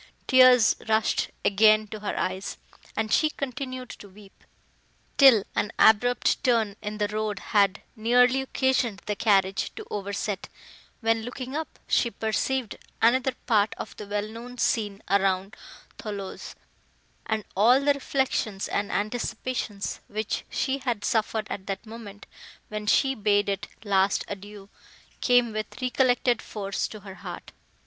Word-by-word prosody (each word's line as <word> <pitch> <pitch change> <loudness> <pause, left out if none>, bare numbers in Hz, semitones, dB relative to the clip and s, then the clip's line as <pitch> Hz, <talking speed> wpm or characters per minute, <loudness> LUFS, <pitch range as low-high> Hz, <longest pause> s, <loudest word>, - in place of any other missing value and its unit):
Tears 255 -3 +6
rushed 220 0 +2 0.2
again 215 +1 +5
to 215 - -6
her 210 - -4
eyes, 190 +1 -3 0.4
and 220 0 0
she 310 - +4
continued 255 -2 -5
to 205 - -12
weep, 195 0 -17 0.8
till 260 -8 +8
an 210 - 0
abrupt 245 +3 +4
turn 225 -5 +2
in 210 +1 -5
the 210 -1 0
road 215 -1 -2 0.2
had 200 -1 +3
nearly 250 +4 +4
occasioned 260 -5 0
the 210 - -2
carriage 195 -3 +2
to - - -8
overset, 200 0 -3 0.5
when, 225 0 +2
looking 255 +3 -6
up, 315 +1 -5
she 235 - +2
perceived 225 +3 -2 0.2
another 255 +3 +3
part 215 -3 +2
of - - -7
the 210 - -8
well 205 +1 -2
known 235 +3 -9
scene 210 -4 0
around 195 0 +1 0.4
Thoulouse, 200 -3 -6 0.7
and 220 -1 -1
all 235 +7 +5
the 285 +1 +3
reflections 265 -7 -1
and 205 0 -2
anticipations, 220 -1 -3
which 215 +1 -3
she 270 +1 -1
had 240 -6 -2
suffered, 220 -1 0
at 190 - -5
the 195 -1 -2
moment, 215 -2 -10 0.4
when 210 0 -5
she 270 +5 +3
bade 205 -3 +2
it 200 0 -2 0.2
last 195 -1 +2
adieu, 205 0 -9 0.5
came 245 -3 +3
with 215 0 -5
recollected 250 -1 +2
force 200 -2 -3
to 215 - -10
her 195 -1 -9
heart. - - -8
215 Hz, 140 wpm, -26 LUFS, 205-245 Hz, 0.8 s, till